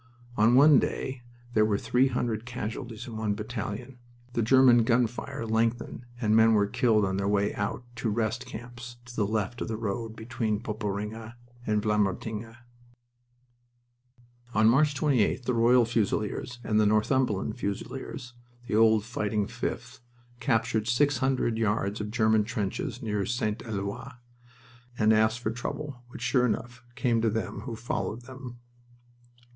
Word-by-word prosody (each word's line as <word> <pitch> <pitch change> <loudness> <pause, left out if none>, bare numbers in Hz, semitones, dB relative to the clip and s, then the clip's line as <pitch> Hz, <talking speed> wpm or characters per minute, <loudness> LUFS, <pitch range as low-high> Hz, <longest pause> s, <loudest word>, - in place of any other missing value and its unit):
On 115 +3 +4
one 140 0 +8
day 130 -1 -3 0.3
there 110 - +4
were 105 -2 +2
three 125 +5 +2
hundred 120 -3 -1
casualties 120 0 -5
in 115 -4 -7
one 110 -2 -1
battalion 110 +3 -5 0.3
The 120 - +1
German 120 0 +6
gun 120 +1 +3
fire 120 +2 -5
lengthened, 115 +2 -1
and 110 -3 +2
men 110 0 +6
were 105 -1 +4
killed 110 -1 +2
on 95 0 -1
their 100 0 -1
way 100 0 +1
out 105 +4 -3
to 115 - -1
"rest" 110 0 -1
camps 120 +2 -9
to 120 0 -11
the 105 -4 +1
left 110 +3 -2
of - - -2
the 110 -1 -3
road 110 +1 -3
between 110 -2 -2
Poperinghe 110 +1 -4 0.3
and 105 -1 +1
Vlamertinghe. 105 +2 -1 2.0
On 110 +1 +5
March 145 +5 +4
28th 130 -4 +2
the 125 - 0
Royal 120 +1 +5
Fusiliers 115 +1 -1
and 105 -1 +1
the 105 - +4
Northumberland 110 0 +1
Fusiliers 105 +3 -5 0.3
the 105 - -2
old 110 -1 +5
Fighting 105 -2 -1
Fifth 120 +2 -5 0.4
captured 110 -4 +1
six 135 +2 +2
hundred 130 -4 +1
yards 105 -1 0
of 105 - -4
German 110 -1 +3
trenches 110 +2 -3
near 105 -3 -1
St. 110 -1 -1
Eloi 100 +3 -4 0.9
and 110 0 +4
asked 110 +1 +3
for 110 - -1
trouble, 125 +2 -5
which, 125 - -9
sure 125 -2 +3
enough, 120 +1 -4
came 120 -4 +1
to 115 - +2
them 110 -1 -3
who 120 -4 -4
followed 115 0 -3
them. 125 -1 -9
115 Hz, 150 wpm, -28 LUFS, 105-120 Hz, 2.0 s, one